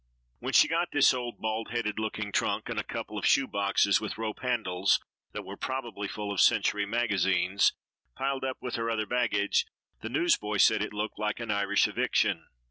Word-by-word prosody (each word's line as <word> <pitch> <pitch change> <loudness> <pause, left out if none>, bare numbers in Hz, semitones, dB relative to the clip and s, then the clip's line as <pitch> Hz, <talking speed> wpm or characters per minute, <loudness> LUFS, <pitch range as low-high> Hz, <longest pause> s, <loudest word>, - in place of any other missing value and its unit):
When - - -4
she - - +7
got 170 +1 0
this 145 - +5
old, 125 -2 -4
bald 110 0 -3
headed 110 -3 -2
looking 105 -1 -3
trunk - - -1
and - - -2
a - - -2
couple - - -5
of - - -4
shoe 135 - +4
boxes 100 -2 +2
with 110 - -5
rope 110 -1 -4
handles 100 -7 +1 0.3
(that - - -5
were - - -7
probably 120 -6 -4
full 105 0 -5
of 100 - +1
Century 105 -1 +3
Magazines) 100 -4 +2 0.4
piled 135 0 -2
up 130 -1 -2
with 125 - -6
her 115 0 -2
other 110 -2 -1
baggage, 110 -4 +1 0.3
the 110 - -5
newsboy 120 -7 +1
said 105 +2 +5
it 105 - -2
looked 105 +1 -4
like 105 +1 -2
an 115 -2 -3
Irish 100 0 +2
eviction. - - 0
110 Hz, 190 wpm, -28 LUFS, 100-120 Hz, 0.4 s, she